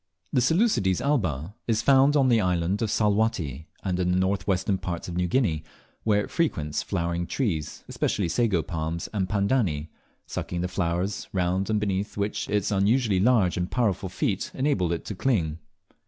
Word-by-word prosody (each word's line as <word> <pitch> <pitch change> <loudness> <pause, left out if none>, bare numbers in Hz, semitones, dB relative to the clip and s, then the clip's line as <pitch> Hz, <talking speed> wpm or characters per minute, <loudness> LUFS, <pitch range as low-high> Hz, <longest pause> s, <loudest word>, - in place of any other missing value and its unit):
The 125 - +3
Seleucides 160 - +2
alba 95 - -1
is 110 -1 +1
found 140 +2 +5
in 135 -3 +4
the 115 -3 +4
island 90 +2 0
of 110 - 0
Salwatty, 100 - 0 0.2
and 90 -2 -1
in 90 -1 +1
the 90 - +2
north 95 +2 0
western 95 0 +1
parts 85 -2 -4
of 85 - -5
New 90 0 +1
Guinea, 85 - +1 0.4
where 105 -2 +2
it - - -9
frequents 80 - 0
flowering 85 -2 -2
trees, 85 - -2
especially 100 - -1
sago 90 -1 +1
palms 80 +1 -3
and 95 -3 -1
pandani, 100 - 0 0.4
sucking 85 -1 -4
the 90 - 0
flowers, 90 +1 -2
round 95 +1 0
and 110 -1 +2
beneath 100 0 -2
which 100 +1 -2
its 105 -1 0
unusually 105 +1 +2
large 105 -5 +3
and 90 +1 -1
powerful 105 -6 0
feet 95 +1 -1
enable 130 - +1
it 85 - -3
to - - -4
cling. 90 - 0
95 Hz, 170 wpm, -26 LUFS, 85-110 Hz, 0.4 s, found